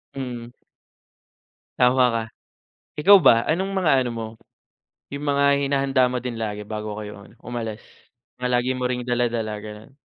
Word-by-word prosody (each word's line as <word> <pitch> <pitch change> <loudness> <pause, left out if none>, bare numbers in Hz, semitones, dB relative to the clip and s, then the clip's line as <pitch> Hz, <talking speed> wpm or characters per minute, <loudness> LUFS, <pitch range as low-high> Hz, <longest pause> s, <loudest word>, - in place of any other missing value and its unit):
Mm. 120 -3 -6 1.3
Tama 125 +1 +4
ka, 115 -1 -1 0.8
ikaw 200 +6 +8
ba, 115 -7 +5
anong 190 +5 0
mga 180 -5 +2
ano 120 - -2
mo, 115 -1 -5 0.9
yung 140 +1 -5
mga 140 0 +2 0.2
hinahanda 135 -2 +2
mo 125 - -1
din 125 -1 -5
lagi 105 -1 -4
bago 105 -1 -5
kayo 105 -1 -8
ano, - - -18
umalis? 115 -2 -5 0.6
Palagi 125 0 0
mo 125 0 -1
ring 125 0 -3
dala-dala 120 -3 -1
ganon. 105 +2 -10
125 Hz, 145 wpm, -23 LUFS, 110-135 Hz, 1.3 s, ikaw